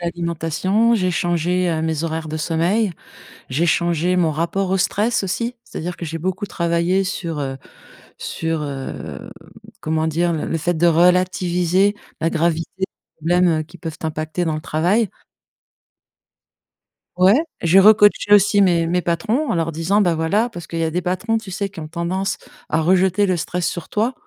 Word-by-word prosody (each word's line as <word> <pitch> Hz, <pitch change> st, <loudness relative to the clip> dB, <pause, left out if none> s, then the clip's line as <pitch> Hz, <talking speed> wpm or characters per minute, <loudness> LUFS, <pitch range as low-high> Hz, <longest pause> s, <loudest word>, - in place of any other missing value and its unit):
l'alimentation, 175 Hz, +6 st, 0 dB
j'ai 185 Hz, -4 st, +1 dB
changé, 175 Hz, +1 st, 0 dB
heu, 160 Hz, -1 st, -1 dB
mes 160 Hz, 0 st, -1 dB
horaires 160 Hz, -1 st, -3 dB
de 155 Hz, -, -4 dB
sommeil, 175 Hz, +7 st, 0 dB, 0.6 s
j'ai 145 Hz, +6 st, 0 dB
changé 175 Hz, +1 st, +1 dB
mon 170 Hz, -3 st, +2 dB
rapport 170 Hz, +5 st, -1 dB
au 190 Hz, -, +2 dB
stress 210 Hz, +5 st, +1 dB
aussi. 235 Hz, +6 st, -2 dB
C'est-à-dire 180 Hz, -7 st, -6 dB
que -, -, -6 dB
j'ai 165 Hz, 0 st, -4 dB
beaucoup 185 Hz, +4 st, -3 dB
travaillé 170 Hz, +2 st, 0 dB
sur 170 Hz, -4 st, -4 dB
heu 135 Hz, -1 st, -3 dB, 0.6 s
sur 160 Hz, -1 st, -3 dB
heu, 140 Hz, -2 st, -6 dB
mmh, -, -, -17 dB, 0.3 s
comment 160 Hz, 0 st, -1 dB
dire? 170 Hz, +2 st, +1 dB
Le 155 Hz, -, -2 dB
le 165 Hz, -, -1 dB
fait 175 Hz, +3 st, 0 dB
de 170 Hz, +2 st, +2 dB
relativiser 180 Hz, +2 st, +2 dB, 0.3 s
la 165 Hz, -, +2 dB
gravité 165 Hz, 0 st, 0 dB
des 190 Hz, -, +1 dB, 0.3 s
problèmes, 175 Hz, +3 st, +2 dB
heu, -, -, -5 dB
qui 165 Hz, +3 st, -15 dB
peuvent 160 Hz, -2 st, -6 dB
t'impacter 155 Hz, +2 st, -3 dB
dans 160 Hz, -, -1 dB
le 155 Hz, -, -5 dB
travail. 185 Hz, +9 st, +1 dB, 2.1 s
Ouais, 195 Hz, -, +5 dB, 0.2 s
j'ai 175 Hz, +3 st, +5 dB
recoaché 205 Hz, 0 st, +5 dB
aussi 205 Hz, 0 st, +5 dB
mes 170 Hz, -3 st, +3 dB
mes 180 Hz, +1 st, +1 dB
patrons 215 Hz, -, -1 dB
en -, -, 0 dB
leur 165 Hz, -1 st, -1 dB
disant: 170 Hz, +6 st, +1 dB
«bah, 175 Hz, -4 st, +2 dB
voilà» 200 Hz, +9 st, +1 dB
parce 175 Hz, -7 st, -9 dB
qu'il 165 Hz, 0 st, -5 dB
y 165 Hz, -, +1 dB
a 160 Hz, -, -2 dB
des 180 Hz, +3 st, -1 dB
patrons, 200 Hz, +6 st, -1 dB
tu 215 Hz, -4 st, -8 dB
sais? 200 Hz, +2 st, -2 dB
Qui 190 Hz, -4 st, -9 dB
ont 155 Hz, -, -7 dB
tendance 185 Hz, +4 st, -2 dB, 0.3 s
à 155 Hz, -, +1 dB
rejeter 185 Hz, +4 st, +3 dB
le 185 Hz, -2 st, +1 dB
stress 175 Hz, +1 st, -2 dB
sur 175 Hz, -, -5 dB
toi. 225 Hz, +5 st, 0 dB
175 Hz, 180 wpm, -20 LUFS, 165-190 Hz, 2.1 s, Ouais